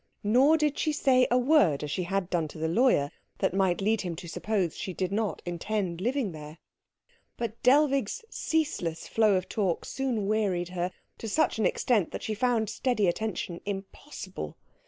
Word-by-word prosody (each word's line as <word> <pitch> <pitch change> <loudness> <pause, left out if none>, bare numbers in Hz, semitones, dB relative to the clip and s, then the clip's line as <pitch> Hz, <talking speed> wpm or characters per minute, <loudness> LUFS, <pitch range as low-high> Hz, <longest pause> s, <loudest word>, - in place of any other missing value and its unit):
Nor 260 +9 +5
did 300 -2 0
she 310 - +1
say 255 -4 +3
a 245 - +3
word, 250 - +4
as 150 - -4
she 180 - -1
had 195 0 -1
done 170 -3 +1
to 150 - -11
the 160 +1 -1
lawyer, 170 - +3 0.3
that - - 0
might 190 -1 +1
lead 215 +2 +2
him 175 -3 -4
to 170 - -8
suppose 190 -1 -1
she 185 - -5
did 185 -1 -2
not 215 0 -1
intend 175 0 -2
living 245 -1 0
there. 155 0 -9 0.8
But 230 -1 -4
Dellwig's 275 - +3
ceaseless 285 - -2
flow 215 -3 +3
of 185 0 -1
talk 190 -6 -1
soon 250 -6 -2
wearied 195 -4 0
her 180 0 -2 0.3
to 225 - -5
such 310 -1 +1
an 210 - +4
extent 215 -8 +1
that - - -5
she 220 - -2
found 230 0 +1
steady 220 0 0
attention 175 -2 -2
impossible. 195 - -7
205 Hz, 180 wpm, -28 LUFS, 175-245 Hz, 0.8 s, Nor